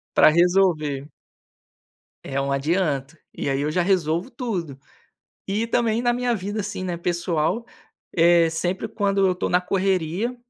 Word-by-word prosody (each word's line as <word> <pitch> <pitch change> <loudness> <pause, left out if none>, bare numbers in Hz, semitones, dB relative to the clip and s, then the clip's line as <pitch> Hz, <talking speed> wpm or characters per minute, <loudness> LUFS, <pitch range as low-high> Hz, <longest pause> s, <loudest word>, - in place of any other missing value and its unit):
Pra - - +7
resolver. 160 -5 +2 1.1
É 140 0 -3
uma 140 0 0
adianto, 150 -1 -1 0.2
e - - -3
aí 135 0 0
eu 150 +1 -1
já 180 - +1
resolvo 175 +1 +1
tudo 185 - -4 0.7
e 210 +4 -1
também 230 -1 +1
na 240 0 +2
minha 245 0 0
vida 205 +2 -4
assim, 200 -2 -5
né, 180 -2 -2
pessoal, 175 +4 -1 0.5
é 170 0 +5
sempre 175 +3 -2
quando 200 -2 +1
eu 185 - +3
estou 180 - -3
na 180 - +3
correria, 190 +4 -1
180 Hz, 150 wpm, -23 LUFS, 155-200 Hz, 1.1 s, Pra